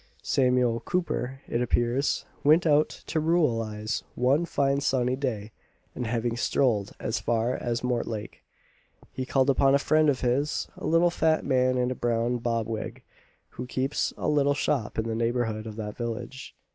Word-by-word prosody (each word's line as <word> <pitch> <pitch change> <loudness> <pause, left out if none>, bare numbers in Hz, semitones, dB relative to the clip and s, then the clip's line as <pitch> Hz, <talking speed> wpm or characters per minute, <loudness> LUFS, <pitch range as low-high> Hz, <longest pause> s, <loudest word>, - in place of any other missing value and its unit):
Samuel 125 -3 +2
Cooper, 135 -3 -2
it 120 - -1
appears, 120 +3 +1 0.2
went 155 +4 +5
out 150 -1 +4 0.2
to 160 - -1
ruralise 115 -10 0
one 135 +7 +2
fine 140 -3 +1
sunny 130 -2 +1
day, 115 -6 -3 0.4
and 125 - -4
having 115 0 -1
strolled 120 -4 +1
as 110 - -2
far 120 +1 0
as 120 0 -3
Mortlake, 115 -4 -3 0.7
he 130 -1 -5
called 135 +1 +3
upon 135 +1 +4
a - - +6
friend 155 +2 +3
of 135 -3 0
his, 130 +4 0
a - - -5
little 170 +2 +4
fat 160 -2 +1
man 130 -1 +2
in 125 0 +1
a - - +1
brown 120 0 0
bob 115 -1 -1
wig, 110 -1 -5 0.5
who 125 - -7
keeps 130 +3 -1
a - - -2
little 145 -1 +3
shop 135 -5 -1
in 110 0 -1
the 115 - -2
neighbourhood 115 -1 -1
of 110 - -7
that 105 -1 -6
village. 120 +3 -6
125 Hz, 165 wpm, -27 LUFS, 115-140 Hz, 0.7 s, a